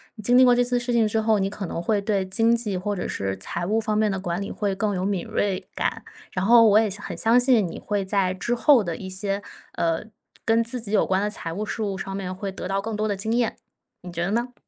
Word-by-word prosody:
你 215 Hz, -, -10 dB
经 245 Hz, +3 st, +4 dB
历 260 Hz, -, +8 dB
过 250 Hz, -1 st, +6 dB
这 245 Hz, -, +3 dB
次 245 Hz, 0 st, 0 dB
事 245 Hz, 0 st, -2 dB
情 230 Hz, -2 st, +3 dB
之 220 Hz, +1 st, 0 dB
后， 215 Hz, -1 st, +2 dB
你 195 Hz, 0 st, 0 dB
可 205 Hz, -1 st, -6 dB
能 170 Hz, -, -4 dB
会 205 Hz, +4 st, +1 dB
对 200 Hz, -2 st, 0 dB
经 225 Hz, +5 st, +2 dB
济 230 Hz, -4 st, -1 dB
或 190 Hz, +3 st, -2 dB
者 180 Hz, -, -3 dB
是 95 Hz, 0 st, -3 dB
财 175 Hz, -, -4 dB
务 215 Hz, +5 st, +1 dB
方 215 Hz, -1 st, -1 dB
面 215 Hz, -1 st, +2 dB
的 190 Hz, -, -2 dB
管 175 Hz, 0 st, -3 dB
理 200 Hz, -, -4 dB
会 200 Hz, -2 st, -2 dB
更 205 Hz, +1 st, 0 dB
有 185 Hz, -, -1 dB
敏 195 Hz, -3 st, -1 dB
锐 195 Hz, -2 st, -1 dB
感。 -, -, -2 dB, 0.3 s
然 185 Hz, +1 st, -2 dB
后 230 Hz, 0 st, +7 dB
我 210 Hz, 0 st, +6 dB
也 220 Hz, -1 st, +2 dB
相 205 Hz, +2 st, -6 dB
很 -, -, -5 dB
相 230 Hz, +2 st, +4 dB
信 245 Hz, -5 st, +3 dB
你 165 Hz, -, -7 dB
会 205 Hz, -1 st, -2 dB
在 190 Hz, -1 st, +1 dB
之 215 Hz, +6 st, -2 dB
后 250 Hz, -2 st, +5 dB
的 170 Hz, -2 st, -4 dB
一 190 Hz, -, -7 dB
些， 195 Hz, +1 st, -3 dB, 0.3 s
呃， 165 Hz, +1 st, 0 dB, 0.4 s
跟 225 Hz, +1 st, +3 dB
自 245 Hz, +1 st, -4 dB
己 215 Hz, -3 st, -6 dB
有 215 Hz, -, +3 dB
关 190 Hz, +1 st, +1 dB
的 210 Hz, -, 0 dB
财 165 Hz, -5 st, -5 dB
务 205 Hz, +5 st, -3 dB
事 220 Hz, +1 st, -3 dB
务 200 Hz, -2 st, -2 dB
上 195 Hz, 0 st, -5 dB
面 185 Hz, -1 st, -4 dB
会 195 Hz, +1 st, -4 dB
得 190 Hz, -, -6 dB
到 195 Hz, +1 st, -1 dB
更 220 Hz, +1 st, -4 dB
多 215 Hz, +1 st, -1 dB
的 205 Hz, -, -1 dB
经 220 Hz, +4 st, -2 dB
验， 240 Hz, -1 st, 0 dB, 0.4 s
你 180 Hz, -1 st, -9 dB
觉 170 Hz, 0 st, -2 dB
得 195 Hz, -, -2 dB
呢？ 240 Hz, +3 st, -1 dB
205 Hz, 305 characters per minute, -24 LUFS, 190-225 Hz, 0.4 s, 历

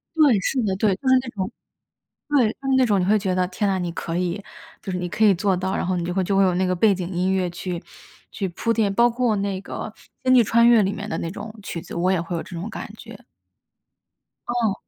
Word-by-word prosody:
对， 285 Hz, -10 st, +5 dB
是 255 Hz, +5 st, 0 dB
的， 190 Hz, -2 st, 0 dB
对， 195 Hz, -1 st, +2 dB
就 265 Hz, -, -7 dB
是 260 Hz, -, +6 dB
那 250 Hz, -, -7 dB
种 190 Hz, -4 st, -4 dB, 0.8 s
对， 290 Hz, -2 st, +3 dB
就 270 Hz, +4 st, -7 dB
是 265 Hz, -, +3 dB
那 260 Hz, -, +5 dB
种， 205 Hz, -4 st, +2 dB
你 180 Hz, -, +1 dB
会 215 Hz, +2 st, +4 dB
觉 190 Hz, -2 st, -1 dB
得， 180 Hz, -1 st, +1 dB
天 200 Hz, +2 st, -1 dB
呐， 190 Hz, -1 st, 0 dB
你 175 Hz, -1 st, -2 dB
可 165 Hz, -1 st, -4 dB
以 180 Hz, +2 st, -2 dB, 0.4 s
就 190 Hz, -, -5 dB
是 180 Hz, -, -2 dB
你 180 Hz, 0 st, -3 dB
可 220 Hz, -, 0 dB
以 205 Hz, -2 st, +7 dB
做 190 Hz, +1 st, +1 dB
到， 190 Hz, +2 st, -2 dB
然 -, -, -1 dB
后 185 Hz, 0 st, 0 dB
你 175 Hz, -, -2 dB
就 175 Hz, -, -2 dB
会 190 Hz, -1 st, +1 dB
就 195 Hz, +2 st, 0 dB
会 195 Hz, -, +5 dB
有 185 Hz, -1 st, +3 dB
那 185 Hz, +1 st, +1 dB
个 185 Hz, 0 st, 0 dB
背 205 Hz, +3 st, +4 dB
景 180 Hz, -1 st, -4 dB
音 185 Hz, +2 st, 0 dB
乐 185 Hz, -2 st, 0 dB
去 175 Hz, 0 st, -5 dB, 0.5 s
去 195 Hz, -2 st, -3 dB
铺 230 Hz, +6 st, -2 dB
垫。 210 Hz, -4 st, +1 dB
包 235 Hz, +3 st, +4 dB
括 240 Hz, -2 st, +1 dB
那 195 Hz, -1 st, -2 dB
个 215 Hz, -, -6 dB, 0.3 s
《星 255 Hz, 0 st, +4 dB
际 240 Hz, -, +7 dB
穿 235 Hz, +2 st, +4 dB
越》 235 Hz, -3 st, +6 dB
里 195 Hz, -, 0 dB
面 205 Hz, +1 st, -6 dB
的 -, -, -2 dB
那 165 Hz, -, -3 dB
种 210 Hz, +2 st, -8 dB
曲 170 Hz, -3 st, -5 dB
子， 180 Hz, -, -9 dB
我 180 Hz, +2 st, +1 dB
也 185 Hz, -, +2 dB
会 170 Hz, +1 st, -4 dB
有 165 Hz, -, -3 dB
这 175 Hz, -, -10 dB
种 205 Hz, +6 st, -5 dB
感 -, -, -7 dB
觉。 -, -, -11 dB, 1.3 s
嗯。 235 Hz, -4 st, +1 dB
195 Hz, 285 characters per minute, -23 LUFS, 180-220 Hz, 1.3 s, 以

